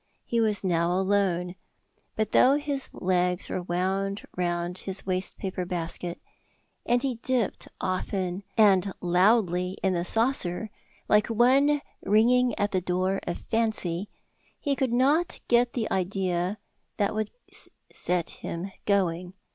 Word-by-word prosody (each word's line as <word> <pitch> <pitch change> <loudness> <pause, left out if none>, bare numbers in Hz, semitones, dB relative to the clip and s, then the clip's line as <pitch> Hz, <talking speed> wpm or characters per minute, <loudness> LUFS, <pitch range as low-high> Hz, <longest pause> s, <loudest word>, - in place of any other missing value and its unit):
He 235 -1 +1
was 210 -2 +1
now 170 -2 +1
alone. 185 -2 +1 0.6
But 215 0 -1
though 265 +2 +6
his 285 -2 -1
legs 180 0 0
were 185 - -2
wound 190 +3 -1
round 175 0 -1
his 195 0 -5
waste 185 0 -2
paper 185 -2 -3
basket, 175 0 -4 0.7
and 245 +2 +2
he 260 -4 -1
dipped 250 -6 -1
often 185 0 -2 0.2
and 195 -3 +5
loudly 180 0 +2
in 190 -1 +2
the 170 -1 0
saucer, 215 -2 0 0.4
like 210 0 +4
one 270 +6 +3 0.2
ringing 240 +3 +3
at 205 0 0
the 185 - +1
door 185 +2 0
of 175 - -2
Fancy, 210 -5 -1 0.5
he 285 -2 0
could 265 -2 0
not 285 +8 +2
get 240 0 +3
the 230 -3 -1
idea 185 0 -1 0.4
that 200 0 +1
would 215 -1 -1 0.6
set 175 -2 -1
him 175 +4 -6 0.2
going. 185 -2 +1
195 Hz, 130 wpm, -27 LUFS, 180-225 Hz, 0.7 s, though